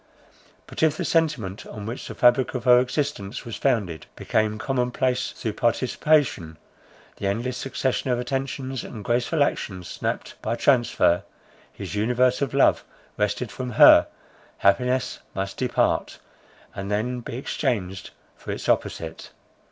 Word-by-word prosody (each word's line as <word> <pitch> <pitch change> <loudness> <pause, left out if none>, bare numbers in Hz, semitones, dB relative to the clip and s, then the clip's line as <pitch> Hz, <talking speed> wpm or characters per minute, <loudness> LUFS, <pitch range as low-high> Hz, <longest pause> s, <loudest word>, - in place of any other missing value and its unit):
But - - -7
if 155 -1 +3
the - - -2
sentiment 140 - 0
on 105 -1 -8
which 115 +4 -6
the - - -7
fabric 125 +2 +3
of 125 - -3
her 125 -1 +7
existence 125 -5 -2
was 115 - -5
founded, 105 - -1
became 110 0 0
common 125 0 -1
place 130 0 0
through 110 - -4
participation, 120 - +1 0.6
the 100 - -2
endless 120 +6 -1
succession 130 0 -2
of 125 - +2
attentions 130 0 -3
and 105 -4 -9
graceful 125 +6 +2
action 95 -9 -3
snapt - - -5
by 115 - -1
transfer, 120 -9 +3 0.5
his - - -7
universe 125 +5 +2
of 140 -1 -1
love 140 - +4 0.3
wrested 105 +2 -1
from 125 -2 -5
her, - - +8 0.5
happiness 125 +6 +1 0.2
must 95 0 -3
depart, 125 -2 0 0.6
and 100 0 -5
then 115 +5 -1
be 120 0 -6
exchanged 105 -9 -2 0.3
for - - -12
its - - -4
opposite. - - -1
125 Hz, 140 wpm, -24 LUFS, 105-130 Hz, 0.6 s, her